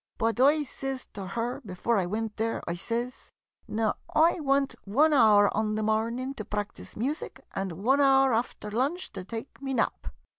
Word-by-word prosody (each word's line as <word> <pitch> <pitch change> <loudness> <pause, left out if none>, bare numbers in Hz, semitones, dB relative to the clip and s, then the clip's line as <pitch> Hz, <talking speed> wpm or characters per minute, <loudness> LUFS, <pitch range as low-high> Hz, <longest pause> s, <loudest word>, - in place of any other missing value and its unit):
But 225 +1 0
I 295 +3 +5
sez 270 -1 -5
to 195 -2 -6
her 235 +7 -3
before 210 +2 0
I 180 - -1
wint 215 +2 -3
there 225 +1 -1
— - - -35
I 170 - -1
sez, 235 +8 -4 0.2
" - - -66
Now, 220 0 0 0.2
I 330 +3 +5
want 275 -2 +1
one 290 +10 +3
hour 210 -6 +5
on 215 0 0
the 215 - -1
mornin' 230 +5 0
to 215 - -4
practise 205 0 -5
music, 265 +4 -3
and 195 -2 -3
one 250 - +2
hour 270 -2 +5
after 225 -2 -2
lunch 275 - -1
to - - -6
take 225 +7 -8
me 270 -1 -2
nap. 230 - -1
230 Hz, 190 wpm, -28 LUFS, 210-270 Hz, 0.2 s, I